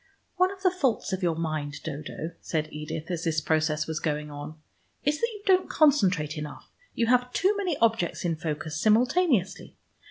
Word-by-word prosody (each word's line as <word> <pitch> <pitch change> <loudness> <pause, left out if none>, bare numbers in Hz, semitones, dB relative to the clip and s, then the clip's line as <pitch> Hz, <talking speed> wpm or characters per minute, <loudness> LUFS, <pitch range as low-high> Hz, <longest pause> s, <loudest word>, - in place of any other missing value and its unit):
"One 370 +1 +4
of 390 -1 -11
the 370 - +5
faults 265 - 0
of 190 - -2
your 170 -3 +1
mind, 155 -3 -3
Dodo," 155 +2 -5
said 155 -1 -3
Edith, 150 +3 -5
as 170 -2 -2
this 160 -2 +1
process 155 0 +1
was 160 -1 -3
going 150 -1 -2
on, 145 +2 -7 0.5
"is 295 +1 0
that 465 - +3
you 415 -2 -10
don't 370 -1 +3
concentrate 185 - +3
enough. 150 -1 -8 0.2
You 230 - +2
have 250 +1 +3
too 390 +3 +2
many 370 -7 -1
objects 225 -7 +1
in 165 -1 +1
focus 155 0 -4
simultaneously. 245 - +2
170 Hz, 180 wpm, -27 LUFS, -, 0.5 s, the